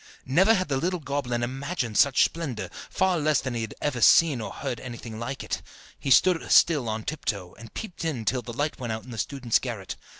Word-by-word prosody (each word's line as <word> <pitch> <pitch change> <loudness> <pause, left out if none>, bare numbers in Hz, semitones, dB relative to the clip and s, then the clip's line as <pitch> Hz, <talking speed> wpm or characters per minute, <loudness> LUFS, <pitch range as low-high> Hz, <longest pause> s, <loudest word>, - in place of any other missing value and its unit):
Never 190 - +4
had 185 -1 0
the 140 -2 0
little 180 +6 0
goblin 135 -4 -2
imagined 130 -1 -3
such 140 +2 +5
splendour, 125 - -4 0.2
far 190 -2 +1
less 150 -1 +2
had 130 - -3
he 115 -1 -2 0.2
ever 130 -5 -1
seen 145 -1 +6
or - - -5
heard 120 - -4
anything 120 -3 -8
like 130 +4 -4
it. - - -3 0.4
He 140 - -3
stood 175 +5 +4
still 145 -9 +5
on 110 0 -3
tiptoe, 100 - -3
and 115 -1 -13
peeped 215 -6 -6
in 140 -9 -2
till 125 +2 +1
the 120 - -8
light 145 +6 -2
went 120 -3 -3
out 110 0 -4
in 130 - -11
the 115 - -6
student's 125 +1 +1
garret. 110 -7 -5
130 Hz, 210 wpm, -26 LUFS, 115-155 Hz, 0.4 s, seen